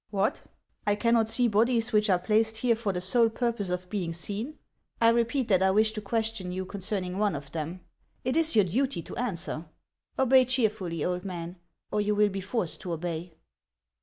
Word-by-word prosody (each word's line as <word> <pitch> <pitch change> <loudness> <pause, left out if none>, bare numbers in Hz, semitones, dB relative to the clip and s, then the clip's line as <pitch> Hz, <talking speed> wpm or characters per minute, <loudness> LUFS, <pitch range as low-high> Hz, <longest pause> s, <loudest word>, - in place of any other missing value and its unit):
" - - -59
What! 200 0 0 0.5
I 205 - +3
cannot 230 0 +2
see 240 +2 +5
bodies 230 +2 +2
which 210 0 +3
are 185 - +5
placed 220 +4 +1
here 235 0 +2
for 220 -3 -2
the 180 - -3
sole 225 +6 +3
purpose 230 -4 -2
of 180 0 -3
being 180 -5 -2
seen! 210 - -4 0.4
1 230 0 +5
repeat, 235 +2 0
that 190 -2 +4
I 190 - +4
wish 215 +3 +3
to 215 -1 -5
question 220 -3 -2
you 185 +1 -3
concerning 190 -1 -3
one 210 -4 +1
of 140 0 -8
them; 165 +3 -5 0.4
it 255 - 0
is 325 0 +3
your 210 -3 +5
duty 245 0 -1
to - - -8
answer. 170 -8 -3 0.5
Obey 260 0 +5
cheerfully, 215 - 0
old 180 0 -2
man, 175 -2 -6 0.3
or 210 - +1
you 210 0 0
will 210 0 +4
be 195 0 -4
forced 190 -3 -2
to 175 - -4
obey." 165 0 -5
210 Hz, 195 wpm, -28 LUFS, 180-230 Hz, 0.5 s, see